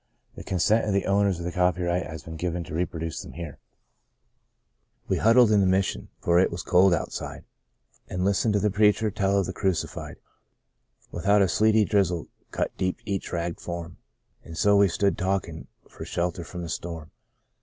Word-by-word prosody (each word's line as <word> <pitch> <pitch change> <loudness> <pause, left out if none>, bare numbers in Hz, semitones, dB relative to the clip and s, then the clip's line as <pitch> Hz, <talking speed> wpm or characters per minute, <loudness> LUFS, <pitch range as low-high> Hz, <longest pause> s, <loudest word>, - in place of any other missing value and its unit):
The - - -9
consent 105 +5 +2
of 105 - 0
the 100 - +1
owners 100 -2 +2
of 85 - -6
the 90 - -2
copyright 90 -1 0
has 80 -2 -8
been 80 +2 -8
given 85 +1 -3
to 75 - -10
reproduce 80 -1 -3
them - - -10
here: 85 -4 -8 0.7
" - - -47
We - - +1
huddled 115 0 +5
in 105 - +5
the 95 - +3
Mission, 95 +1 0
for 85 0 +3
it 95 - +4
was 85 +1 -5
cold 90 +2 +4
out 85 - -1
side, - - -6 0.6
An' 90 0 -3
listened 100 +2 +2
to - - +3
the 105 0 +1
preacher 105 +1 +3
tell 100 0 +1
of 100 - +2
the 95 - -5
Crucified; 95 -3 -2 1.0
Without, 100 +3 +3
a - - +3
sleety 110 +3 +3
drizzle 95 -6 0 0.2
cut - - -3
deep 95 -1 -1
each 100 -3 -3
ragged 85 -1 -3
form, 85 -3 -6 0.5
And 80 -1 -10
so 100 0 +4
we 100 0 +6
stood 100 +2 +1
the - - -7
talkin' 95 -4 -2 0.2
for - - -10
shelter 85 0 -2
from 90 +1 -7
the 85 - -6
storm. 80 -2 -6
90 Hz, 190 wpm, -26 LUFS, 85-100 Hz, 1.0 s, we